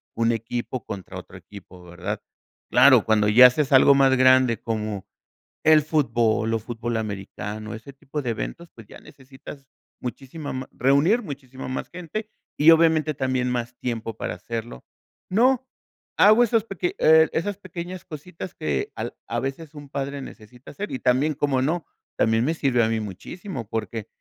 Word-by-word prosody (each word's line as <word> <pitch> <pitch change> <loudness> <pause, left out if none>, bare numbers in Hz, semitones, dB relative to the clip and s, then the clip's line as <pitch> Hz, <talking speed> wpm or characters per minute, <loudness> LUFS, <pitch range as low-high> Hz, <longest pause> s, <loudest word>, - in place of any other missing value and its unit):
un 115 0 +2
equipo 120 +2 -4
contra 95 -3 -7
otro - - -14
equipo, 95 -3 -14
¿verdad? 90 +4 -5 0.5
Claro, 125 -3 +7
cuando 105 -1 +3
ya 125 +4 +9
haces 140 +3 -1
algo 140 +1 +7
más 135 -1 +4
grande, 130 -3 +4
como 110 -3 -4 0.6
el 155 -1 +7
fútbol 115 -7 +1
o 115 - +1
fútbol 115 +1 -4
americano, 105 +1 -5
ese 115 +5 -11
tipo 140 +2 -6
de 125 - -3
eventos, 165 +9 -6
pues 115 - -13
ya - - -13
necesitas 135 +1 -13 0.3
muchísima 135 +4 -6
ma 130 0 -6
reunir 140 - +3
muchísima 135 -6 -8
más 130 - -4
gente, 180 +5 -6 0.3
y 150 +2 +6
obviamente, 160 -1 +4
también 130 -2 -1
más 120 0 -3
tiempo 115 -2 -4
para - - -4
hacerlo. 115 - -7 0.5
No, 255 +5 +3 0.5
hago 215 +4 +7
esos 230 -2 +2
peque 185 -4 -3
eh, 160 0 +6
esas 195 +4 -2
pequeñas 185 -1 -8
cositas 175 +2 -9
que 70 -4 -2
al - - -5
a 120 - -2
veces 140 +4 -5
un 145 -1 -11
padre 140 0 -4
necesita 125 0 -12
hacer 205 +8 -6
y 130 - -4
también, 135 +5 +2
¿cómo 140 -3 0
no?, 165 +4 -1 0.3
también 110 +1 +2
me 160 - +1
sirve 130 -6 +2
a 110 - +2
mí 115 0 0
muchísimo, 115 - -7
porque, 110 -1 -4
130 Hz, 165 wpm, -24 LUFS, 115-155 Hz, 0.6 s, ya